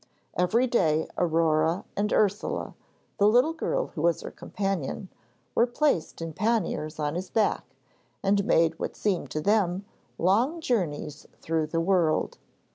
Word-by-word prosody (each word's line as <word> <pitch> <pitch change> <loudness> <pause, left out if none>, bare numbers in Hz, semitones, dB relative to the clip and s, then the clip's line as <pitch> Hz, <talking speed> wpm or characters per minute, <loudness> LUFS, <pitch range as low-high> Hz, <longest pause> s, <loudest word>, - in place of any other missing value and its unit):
Every 200 +8 +2
day 160 -10 +2
Aurore 165 0 +1
and 205 +1 0
Ursule, 205 -1 0 0.5
the 205 - +5
little 250 +9 +4
girl - - -1
who 150 - -4
was 170 0 +2
her - - -7
companion, 195 -2 -3 0.4
were 235 - +3
placed 240 - 0
in 165 -1 -5
panniers 175 -6 -1
on 150 -1 -1
his 180 +2 -4
back, 220 +2 0 0.5
and 200 +1 +3
made 165 -3 +2
what - - -4
seemed 195 -4 -1
to 155 - -3
them 200 -1 +1 0.3
long 230 - +2
journeys 165 - -2
through 160 -1 -1
the 165 +2 -1
world. 170 -3 +1
185 Hz, 140 wpm, -27 LUFS, 160-215 Hz, 0.5 s, the